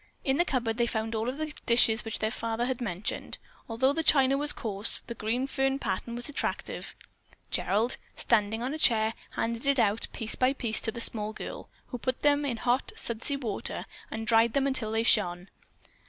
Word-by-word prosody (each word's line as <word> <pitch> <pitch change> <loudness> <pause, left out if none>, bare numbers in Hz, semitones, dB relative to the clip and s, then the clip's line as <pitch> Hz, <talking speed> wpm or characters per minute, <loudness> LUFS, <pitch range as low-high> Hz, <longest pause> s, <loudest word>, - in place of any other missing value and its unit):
In 270 0 +1
the 345 - +3
cupboard 235 -7 -1
they 235 -1 +2
found 220 -1 -2
all 225 +2 -1
of 260 - -5
the 310 -1 -4
dishes 235 -1 +5
which 225 -2 -1
their 215 0 -1
father 230 0 -2
had 255 -1 -2
mentioned. 195 -3 -3 0.3
Although 260 +5 +2
the 325 - 0
china 275 -4 +4
was 295 +1 +4
coarse, 210 -1 +2
the 235 - -6
green 235 +4 -1
fern 270 0 0
pattern 235 -1 -3
was 240 0 -2
attractive. 290 - -3 0.6
Gerald, 225 +5 +1 0.2
standing 225 0 +1
on 260 +3 -2
a 315 - -5
chair, 220 -5 +3 0.2
handed 230 +3 -2
it 280 0 +3
out, 220 -2 +1
piece 225 -1 -2
by 255 +1 +2
piece, 230 -5 0
to 225 - -2
the 235 - -1
small 215 -2 +1
girl, - - -8 0.2
who 245 - -5
put 255 +1 -3
them 290 0 +3
in 250 -5 -2
hot, 245 +3 0
sudsy 235 +5 -1
water 230 -7 -4 0.2
and 220 - -5
then - - -5
dried 225 0 +4
them 275 -1 +1
till 220 -5 0
they 225 +1 +1
shone. 180 -5 +2
235 Hz, 200 wpm, -28 LUFS, 220-265 Hz, 0.6 s, dishes